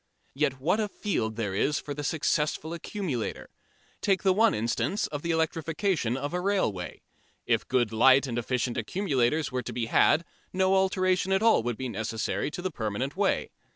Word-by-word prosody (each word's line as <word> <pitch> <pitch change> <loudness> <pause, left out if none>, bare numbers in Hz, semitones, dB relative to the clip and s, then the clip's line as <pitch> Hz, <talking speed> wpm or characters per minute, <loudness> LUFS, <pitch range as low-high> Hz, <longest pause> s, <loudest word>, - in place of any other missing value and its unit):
Yet 130 -1 0
what 180 +10 +1
a 215 - +1
field 115 - -2
there 105 -4 -2
is 145 +9 +1
for 145 - -6
the 145 +1 -5
successful 155 +1 0
accumulator! 170 - -4 0.5
Take 195 0 +1
the 190 -1 +4
one 220 +3 +4
instance 115 - -1
of 145 -1 -5
the 170 - -4
electrification 160 - 0
of 145 +4 -4
a 180 - 0
railway. 145 - -1 0.4
If - - +1
good 120 -4 +1
light 130 +5 +6
and 120 -2 -2
efficient 125 0 -1
accumulators 145 - 0
were 125 0 -1
to - - -6
be 120 - -1
had, 160 +7 +3 0.3
no 190 0 +2
alteration 185 -1 +2
at 190 +2 +2
all 225 - +5
would 120 -1 -3
be 130 - -3
necessary 110 +3 -2
to 175 - -7
the 185 - -2
permanent 120 +3 -3
way. 200 0 0
145 Hz, 180 wpm, -28 LUFS, 120-185 Hz, 0.5 s, light